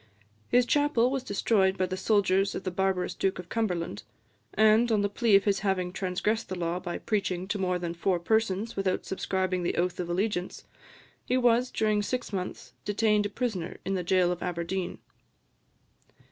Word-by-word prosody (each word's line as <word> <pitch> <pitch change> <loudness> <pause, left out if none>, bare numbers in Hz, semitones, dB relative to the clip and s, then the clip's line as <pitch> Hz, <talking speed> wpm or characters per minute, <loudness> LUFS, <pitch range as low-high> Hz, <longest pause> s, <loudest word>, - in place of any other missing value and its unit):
His 245 0 +4
chapel 275 -3 +2
was 270 -1 -1
destroyed 195 -3 +1
by 185 - +1
the 185 0 -3
soldiers 195 -1 +2
of - - -4
the 185 - -2
barbarous 190 0 0
Duke 190 0 -1
of 180 -1 -9
Cumberland; 180 - -2 0.5
and, 220 +2 +5
on 215 -2 +3
the 205 - +1
plea 220 0 +3
of 195 - +5
his 200 -2 +1
having 185 -3 -1
transgressed 195 +4 -1
the 185 - -4
law 170 +1 -1
by 175 -1 -4
preaching 190 -4 -2
to 205 - -1
more 180 -1 0
than 175 -1 -4
four 175 +2 0
persons 220 +3 0
without 195 -2 -1
subscribing 185 -1 -1
the 175 - -1
oath 175 +1 0
of 175 -1 -3
allegiance, 185 0 -2 0.6
he 255 - 0
was, 245 0 +3
during 215 -1 +1
six 245 +1 -3
months, 185 -2 -5
detained 210 0 +2
a - - -11
prisoner 200 -6 -3
in 195 - -1
the 185 - 0
jail 180 0 +3
of 180 - -4
Aberdeen. 180 +1 -3
195 Hz, 180 wpm, -28 LUFS, 180-215 Hz, 0.6 s, and